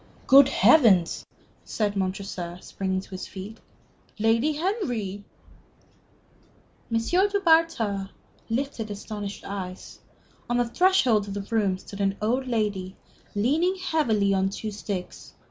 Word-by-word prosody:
"Good 275 0 +7
Heavens!" 215 - +4 0.4
said 205 -2 -2
Montresor, 185 -2 -3
springing 190 -1 -2
to - - -16
his 185 0 -6
feet. 200 +4 -9 0.6
"Lady 230 +7 +2
Henry!" 245 - -2 1.7
M. 230 - +2
du 385 - +2
Bartas 320 - +2 0.4
lifted 230 -2 -2
astonished 205 0 -6
eyes. 190 -2 -7 0.5
On 240 - +1
the 245 - +2
threshold 250 - +3
of 200 - -5
the 200 0 -5
room 200 -4 +2
stood 200 +2 -9
an 195 0 0
old 250 +5 0
lady, 205 -5 -2 0.4
leaning 305 - +2
heavily 235 - +1
on 190 0 +1
two 215 +2 -5
sticks. 200 -3 -6
215 Hz, 120 wpm, -26 LUFS, 195-265 Hz, 1.7 s, Good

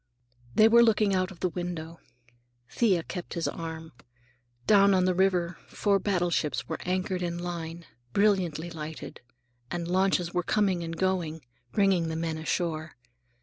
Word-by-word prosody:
They 215 - +7
were 235 +1 +7
looking 215 -3 +3
out 185 0 +1
of 180 -4 -13
the 185 - +1
window. 170 -2 -5 0.7
Thea 185 - +2
kept 180 +1 -6
his 170 - -1
arm. 160 -1 -6 0.7
Down 200 -2 +6
on 185 -1 +3
the 185 - +2
river 180 -2 +1
four 200 -2 +1
battleships 175 -9 0
were - - -4
anchored 185 0 -1
in 170 -1 -2
line, 170 -1 -5 0.3
brilliantly 180 -5 +1
lighted, 155 -1 -7 0.5
and 175 -1 -3
launches 185 -1 +1
were 180 - +1
coming 190 -2 +1
and 165 0 -5
going, 165 -5 -1 0.3
bringing 190 -5 +2
the 160 - -3
men 160 -1 -2
ashore. 160 -1 -2
175 Hz, 145 wpm, -28 LUFS, 165-190 Hz, 0.7 s, They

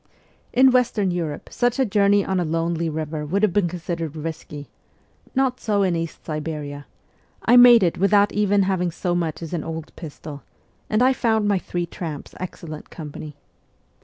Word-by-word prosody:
In 260 +1 +5
Western 230 -6 +2
Europe 165 -4 -4
such 245 0 0
a 265 - +3
journey 200 -1 +3
on 190 -1 0
a - - +1
lonely 165 0 -1
river 155 0 -4
would 190 +8 -1
have 205 -5 +3
been 200 -3 +2
considered 170 -2 -4
risky 155 -2 -6 0.7
not 260 -1 +1
so 205 -2 +1
in 180 -3 +1
East 165 -1 -5
Siberia; 150 -2 -5 0.6
I 240 - +5
made 245 -3 +9
it 170 -2 0
without 200 +1 +4
even 205 -1 +2
having 185 -2 0
so 175 +1 -2
much 170 -2 -2
as 165 - -7
an 170 - -2
old 160 -1 -7
pistol, 150 -2 -9 0.5
and 215 +3 +2
I 260 +1 +5
found 220 -4 +1
my 200 -2 +2
three 175 -1 -3
tramps 160 -3 -7
excellent 165 -4 -7
company. 150 -1 -8
175 Hz, 170 wpm, -22 LUFS, 160-205 Hz, 0.7 s, made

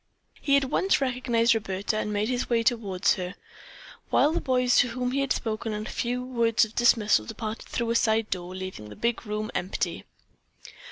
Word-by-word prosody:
He 280 -1 +4
at 275 - +1
once 380 +8 +2
recognized 245 -3 +2
Roberta 205 -2 -2
and 210 0 -2
made 210 +1 0
his 250 0 -2
way 230 -1 +2
toward 205 -5 0
her, 180 +1 0 0.7
while 295 - +4
the - - -1
boys 250 -2 +2
to 245 - +5
whom 250 +1 -2
he 275 - 0
had 275 - -2
spoken 220 -1 -2
a 210 +1 -4
few 245 +2 -2
words 235 -3 +2
of 220 - -13
dismissal 220 - +3
departed 220 - -6
through 235 -1 -2
a - - 0
side 220 -1 +2
door, 180 0 -4
leaving 185 - -7
the 105 - -10
big 235 0 -2
room 215 +1 -3
empty. 185 +2 -3
230 Hz, 185 wpm, -26 LUFS, 210-250 Hz, 0.7 s, to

